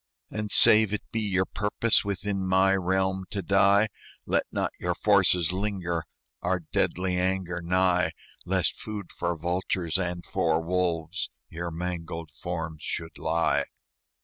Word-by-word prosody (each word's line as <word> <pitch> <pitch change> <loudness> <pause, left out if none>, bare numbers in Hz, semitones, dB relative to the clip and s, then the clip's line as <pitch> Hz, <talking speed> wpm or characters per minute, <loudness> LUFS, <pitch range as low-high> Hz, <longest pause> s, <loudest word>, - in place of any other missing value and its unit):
"And, 105 -1 -3
save 110 0 +6
it - - -6
be 115 - -1
your 95 -3 +1
purpose 105 +4 +1
Within 100 -1 -2
my 95 +1 +4
realm 95 0 0
to 100 -5 -3
die, 100 +3 +4 0.4
Let - - +1
not - - -1
your - - -1
forces 90 -1 +3
linger 90 -4 -2 0.4
Our 90 0 0
deadly 90 +3 0
anger 90 -2 -1
nigh, 90 +1 +2 0.3
Lest - - 0
food 105 -4 -6
for 85 0 -2
vultures 85 +1 -1
and 85 -1 -2
for 80 -1 +1
wolves 85 +1 -1 0.2
Your 85 +1 -4
mangled 85 -1 -5
forms 80 +1 -5
should 80 0 -5
lie." 80 +1 +1
90 Hz, 135 wpm, -27 LUFS, 85-95 Hz, 0.4 s, save